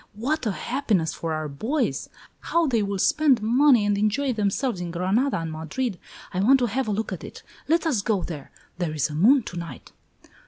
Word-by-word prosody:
What 260 +5 -1
a - - +1
happiness 215 - -1
for 165 - -4
our 155 -1 -2
boys! 220 - -2 0.3
How 335 0 +1
they 240 -7 +1
will 200 -1 -2
spend 295 +3 +3
money 245 0 +4
and 205 0 +2
enjoy 250 +6 +1
themselves 210 0 -1
in 175 - -4
Granada 190 +11 +1
and 165 -1 -4
Madrid! 170 +7 -3 0.3
I 185 - -1
want 250 +8 +5
to 250 - +1
have 250 +2 -1
a - - 0
look 215 +2 -2
at - - -7
it. - - -10 0.2
Let 330 +2 +2
us 270 -11 +1
go 200 -3 0
there. 150 -5 -7 0.3
There 165 -4 -2
is 150 0 0
a - - -6
moon 235 - +5
to 175 - -7
night!" 170 -1 -8
215 Hz, 205 wpm, -25 LUFS, 175-265 Hz, 0.3 s, want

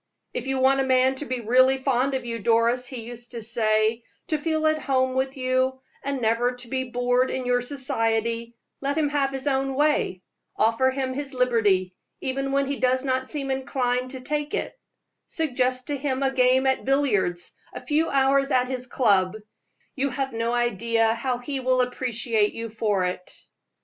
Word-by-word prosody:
"If 250 - -4
you 270 0 0
want 265 +1 +4
a - - +3
man 260 0 +3
to 295 - -4
be 255 -3 -3
really 255 +4 +4
fond 265 0 +1
of 255 -2 -3
you, 230 -1 -4
Doris," 235 +3 +2
he 250 -3 -6
used 240 +1 -10
to 235 - -5
say, 220 0 +1 0.3
"to 310 - 0
feel 315 0 0
at 310 0 +3
home 260 -1 +1
with 265 +1 -1
you, 260 0 0 0.2
and 275 -1 -2
never 230 +3 +2
to 245 0 -7
be 260 +1 -1
bored 245 +1 +1
in 260 -1 -3
your 245 0 +2
society, 230 -3 -1 0.2
let 280 +2 -2
him 300 -2 +2
have 285 -2 +1
his 270 0 -5
own 270 -1 0
way 290 -10 +1 0.3
offer 230 +4 +3
him 260 -1 -2
his 275 0 -4
liberty, 210 -7 +2 0.3
even 270 +1 -2
when 275 0 +2
he 280 0 -3
does 255 +1 +1
not 260 -1 -1
seem 275 -2 -3
inclined 255 -1 -1
to 260 -1 -6
take 295 +3 -2
it; - - -3 0.5
suggest 255 -6 0
to 290 - -2
him 270 -1 -1
a 270 - +2
game 260 0 +3
at 265 0 +1
billiards, 210 -11 0 0.2
a - - -7
few 315 +2 +2
hours 275 0 +3
at 250 -2 +2
his 255 -1 -4
club 200 -7 +2 0.6
you 275 +1 0
have 270 0 -3
no 230 +1 -1
idea 230 -1 +1
how 245 +2 -2
he 270 +3 -4
will 255 0 +1
appreciate 240 -3 0
you 230 0 -5
for 210 -4 0
it." 180 0 -6
255 Hz, 185 wpm, -25 LUFS, 235-270 Hz, 0.6 s, want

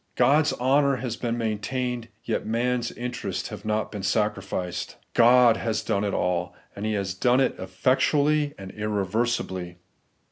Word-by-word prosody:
God's 150 +2 +4
honour 140 +2 +3
has 125 -3 -3
been 120 -1 -2
maintained, 120 +2 -2 0.2
yet - - -1
man's 120 +2 0
interests 125 +1 -4
have - - -8
not 110 0 -1
been 105 - -5
sacrificed. 95 -3 -2 0.2
God 120 -1 +6
has 110 -2 -2
done 100 - 0
it 100 - 0
all; 90 0 -1 0.2
and 105 +2 -3
He 110 - 0
has 100 -2 -1
done 125 +6 +3
it 135 - +2
efifec 95 +8 +1
tually 150 0 +2
and 95 -1 -8
irreversibly. 105 -3 -2
115 Hz, 150 wpm, -25 LUFS, 100-125 Hz, 0.2 s, God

